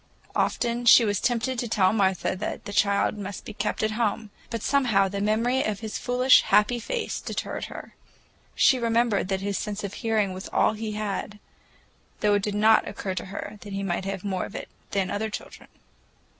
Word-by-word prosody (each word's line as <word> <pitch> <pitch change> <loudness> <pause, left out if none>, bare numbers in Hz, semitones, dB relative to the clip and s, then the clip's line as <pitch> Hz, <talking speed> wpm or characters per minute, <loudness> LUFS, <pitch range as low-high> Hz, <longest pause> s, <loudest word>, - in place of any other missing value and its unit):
Often 240 0 0
she 235 0 +8
was 205 -2 0
tempted 245 +1 0
to 240 - -2
tell 200 -3 +3
Martha 190 -3 +1
that 185 - -5
the 205 - -6
child 200 +1 +2
must 200 0 -6
be - - -7
kept 210 +1 -2
at 215 - +1
home, 215 -1 -1 0.2
but 230 -2 -4
somehow 235 -9 +3
the 200 +1 -4
memory 230 +5 +1
of 215 -1 -3
his 220 -1 -4
foolish, 250 +1 +5
happy 210 +4 +3
face 460 - -3
deterred - - -4
her. - - -9 0.6
She 260 - +4
remembered 230 -4 +1
that 190 -1 -1
his 200 0 -2
sense 210 -1 -4
of 200 -1 -4
hearing 215 -5 0
was 185 +1 -8
nearly - - +2
all - - +3
he 220 0 -4
had,—though 210 0 -5
it 205 - +2
did 205 +1 -2
not 220 +1 +4
occur 190 - -4
to 185 - -4
her 205 +2 -7
that 205 - -8
he 195 0 -3
might 190 0 -2
have 195 -1 -4
more 190 -2 -2
of - - -11
it - - -6 0.2
than 195 -2 -1
other 220 +2 -2
children. - - -8
210 Hz, 200 wpm, -26 LUFS, 200-230 Hz, 0.6 s, she